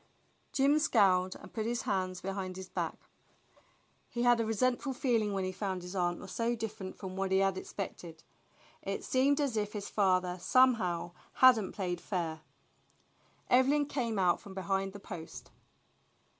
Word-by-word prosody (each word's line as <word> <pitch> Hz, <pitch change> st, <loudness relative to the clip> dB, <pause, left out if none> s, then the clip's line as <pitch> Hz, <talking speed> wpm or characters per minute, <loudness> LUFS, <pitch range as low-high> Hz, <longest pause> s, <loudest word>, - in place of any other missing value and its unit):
Jim 280 Hz, +3 st, +3 dB
scowled 185 Hz, -, +3 dB
and -, -, -13 dB
put 220 Hz, -1 st, -2 dB
his 240 Hz, 0 st, -1 dB
hands 185 Hz, -2 st, -1 dB
behind 190 Hz, -1 st, -4 dB
his 190 Hz, -1 st, -7 dB
back. -, -, -3 dB, 1.1 s
He 240 Hz, -, -2 dB
had 240 Hz, -1 st, +5 dB
a 230 Hz, -, +1 dB
resentful 255 Hz, +5 st, 0 dB
feeling 235 Hz, -5 st, +1 dB
when 195 Hz, -1 st, -1 dB
he 185 Hz, -, -2 dB
found 190 Hz, -1 st, -3 dB
his 180 Hz, +2 st, -7 dB
aunt 175 Hz, -2 st, 0 dB
was 190 Hz, -, -9 dB
so 230 Hz, +4 st, 0 dB
different 215 Hz, -4 st, -6 dB
from 185 Hz, -2 st, -7 dB
what 195 Hz, 0 st, -2 dB
he 190 Hz, -, +4 dB
had 195 Hz, -1 st, +2 dB
expected. 175 Hz, -4 st, -7 dB, 0.6 s
It -, -, -4 dB
seemed 275 Hz, +3 st, +2 dB
as 280 Hz, -5 st, 0 dB
if 210 Hz, -1 st, -1 dB
his 205 Hz, -2 st, -5 dB
father 185 Hz, -3 st, +1 dB
somehow 185 Hz, -7 st, +3 dB, 0.2 s
had 255 Hz, -3 st, +7 dB
n't 190 Hz, -, -6 dB
played 180 Hz, -3 st, -2 dB
fair. 165 Hz, -4 st, -3 dB, 1.1 s
Evelyn 275 Hz, +4 st, +4 dB
came 240 Hz, -6 st, -2 dB
out 180 Hz, -2 st, +2 dB
from 195 Hz, -1 st, -11 dB
behind 195 Hz, +1 st, -1 dB
the 205 Hz, -, -8 dB
post. 175 Hz, -5 st, -9 dB
195 Hz, 165 wpm, -32 LUFS, 185-240 Hz, 1.1 s, had